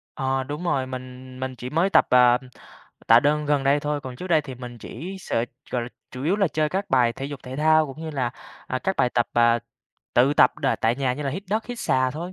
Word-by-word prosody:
Ờ, 135 Hz, -1 st, -1 dB
đúng 150 Hz, +6 st, -5 dB
rồi, 135 Hz, -6 st, 0 dB
mình 130 Hz, 0 st, -9 dB
mình 130 Hz, 0 st, -3 dB
chỉ 125 Hz, +1 st, -6 dB
mới 170 Hz, +5 st, +2 dB
tập, -, -, +5 dB
ờm, 125 Hz, 0 st, +6 dB, 0.7 s
tạ 115 Hz, +1 st, +7 dB
đơn 150 Hz, +1 st, +1 dB
gần 145 Hz, -2 st, +1 dB
đây 140 Hz, +2 st, +3 dB
thôi, 150 Hz, 0 st, -2 dB
còn 130 Hz, -2 st, -8 dB
trước 185 Hz, -, -7 dB
đây 160 Hz, -4 st, +4 dB
thì 135 Hz, -3 st, -8 dB
mình 120 Hz, -1 st, -9 dB
chỉ 180 Hz, +14 st, -7 dB
sệt 115 Hz, -6 st, -1 dB, 0.2 s
gọi 125 Hz, -2 st, -1 dB
là, 120 Hz, -, -5 dB, 0.2 s
chủ 130 Hz, +1 st, -7 dB
yếu 185 Hz, +6 st, +2 dB
là 195 Hz, -5 st, +2 dB
chơi 155 Hz, 0 st, 0 dB
các 195 Hz, +4 st, -3 dB
bài 120 Hz, -3 st, +4 dB
thể 135 Hz, -, -7 dB
dục 145 Hz, -2 st, -7 dB
thể 130 Hz, +1 st, -7 dB
thao 155 Hz, 0 st, +4 dB
cũng 140 Hz, +3 st, -9 dB
như 160 Hz, -1 st, -5 dB
là, 130 Hz, -5 st, -1 dB, 0.4 s
à, 130 Hz, -, -2 dB
các 190 Hz, +6 st, -2 dB
bài 125 Hz, -, +2 dB
tập, 120 Hz, -1 st, +1 dB
à, 120 Hz, 0 st, +4 dB, 0.6 s
tự 130 Hz, +4 st, +4 dB
tập -, -, +4 dB
đà -, -, +1 dB
tại 115 Hz, +2 st, +1 dB
nhà 130 Hz, -2 st, 0 dB
như 150 Hz, -, -5 dB
là 135 Hz, -, -1 dB
hít 190 Hz, +8 st, -5 dB
đất, 220 Hz, +1 st, 0 dB
hít 245 Hz, -1 st, -6 dB
xà 130 Hz, 0 st, +1 dB
thôi. 170 Hz, +5 st, -6 dB
135 Hz, 260 wpm, -24 LUFS, 125-155 Hz, 0.7 s, tạ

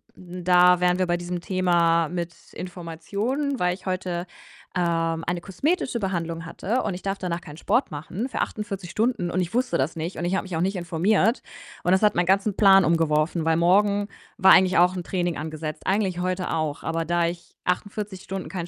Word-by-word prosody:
da 180 Hz, 0 st, +3 dB
wären 180 Hz, 0 st, +2 dB
wir 185 Hz, -, +1 dB
bei 175 Hz, 0 st, +1 dB
diesem 175 Hz, 0 st, -4 dB
Thema 170 Hz, -3 st, +2 dB
mit 175 Hz, -1 st, -4 dB, 0.2 s
Informationen, 200 Hz, -, -3 dB
weil 180 Hz, 0 st, +2 dB
ich 190 Hz, +1 st, -11 dB
heute, 180 Hz, -1 st, -2 dB, 0.5 s
ähm, 165 Hz, -2 st, 0 dB
eine 175 Hz, 0 st, -2 dB
kosmetische 255 Hz, -, -1 dB
Behandlung 165 Hz, -4 st, -3 dB
hatte 225 Hz, +9 st, -2 dB
und 205 Hz, -, -2 dB
ich 180 Hz, -, -7 dB
darf 195 Hz, 0 st, -2 dB
danach 175 Hz, -1 st, -3 dB
keinen 150 Hz, -2 st, -11 dB
Sport 250 Hz, -, +1 dB
machen 175 Hz, -, -5 dB
für -, -, -2 dB
48 195 Hz, -4 st, -4 dB
Stunden 215 Hz, -5 st, 0 dB
und 185 Hz, -, 0 dB
ich 175 Hz, +2 st, -4 dB
wusste 255 Hz, +1 st, +1 dB
das 135 Hz, +6 st, 0 dB
nicht 165 Hz, +3 st, -4 dB
und 170 Hz, -, -3 dB
ich 180 Hz, +2 st, 0 dB
habe 195 Hz, -, -1 dB
mich 185 Hz, -3 st, -6 dB
auch 165 Hz, -, 0 dB
nicht 195 Hz, +2 st, 0 dB
informiert. 190 Hz, +6 st, +1 dB, 0.4 s
Und 180 Hz, -, +3 dB
das 190 Hz, -, +3 dB
hat 210 Hz, -, +5 dB
meinen 175 Hz, 0 st, +1 dB
ganzen 195 Hz, +1 st, +2 dB
Plan 195 Hz, -2 st, +6 dB
umgeworfen, 160 Hz, 0 st, +1 dB
weil 160 Hz, 0 st, +2 dB
morgen 200 Hz, +4 st, +3 dB, 0.3 s
war 190 Hz, 0 st, +6 dB
eigentlich 185 Hz, -1 st, +6 dB
auch 180 Hz, +2 st, +4 dB
'n 180 Hz, -, -4 dB
Training 175 Hz, -2 st, -1 dB
angesetzt, 155 Hz, 0 st, -6 dB
eigentlich 190 Hz, -2 st, +1 dB
heute 185 Hz, 0 st, -2 dB
auch. 155 Hz, -3 st, -2 dB
Aber 165 Hz, 0 st, -2 dB
da 175 Hz, +1 st, +1 dB
ich 170 Hz, 0 st, -7 dB
48 200 Hz, +1 st, -3 dB
Stunden 195 Hz, -1 st, -6 dB
keinen 175 Hz, -3 st, -4 dB
180 Hz, 200 wpm, -24 LUFS, 170-195 Hz, 0.5 s, Plan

